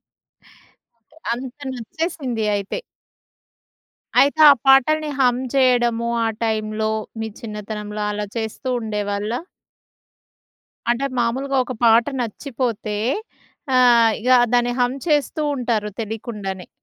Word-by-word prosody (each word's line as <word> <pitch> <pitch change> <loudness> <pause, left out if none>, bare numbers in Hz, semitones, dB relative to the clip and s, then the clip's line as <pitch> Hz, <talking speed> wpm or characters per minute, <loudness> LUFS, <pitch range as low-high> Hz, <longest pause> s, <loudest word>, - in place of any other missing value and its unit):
అంటే, 235 +6 -30 0.2
అంత 255 +3 -6
నచ్చేసింది 255 -2 -3
అయితే. 200 - -3 1.4
అయితే, 285 +3 +3
ఆ - - +10
పాటల్ని 300 +3 +4
హమ్ 250 -2 +3
చేయడము 240 -3 +2 0.2
ఆ - - +1 0.2
టైంలో, 215 0 -1 0.3
మీ 220 - -2
చిన్నతనంలో 210 -1 -6
అలా 210 0 -3
చేస్తూ 220 +3 -4
ఉండేవాళ్ళా? 210 +1 -2 1.5
అంటే, 240 +3 0
మామూలుగా 260 +4 0
ఒక 255 - -5
పాట 230 +1 +6 0.2
నచ్చిపోతే, 230 -2 -3 0.8
ఆహ్, 235 -3 +6
ఇగ 250 +3 0 0.2
దాన్ని 245 0 +2
హమ్ 245 +2 +1
చేస్తూ 300 0 +1
ఉంటారు 230 -4 -1
తెలీకుండానే. 210 -4 -5
235 Hz, 100 wpm, -21 LUFS, 215-255 Hz, 1.5 s, ఆ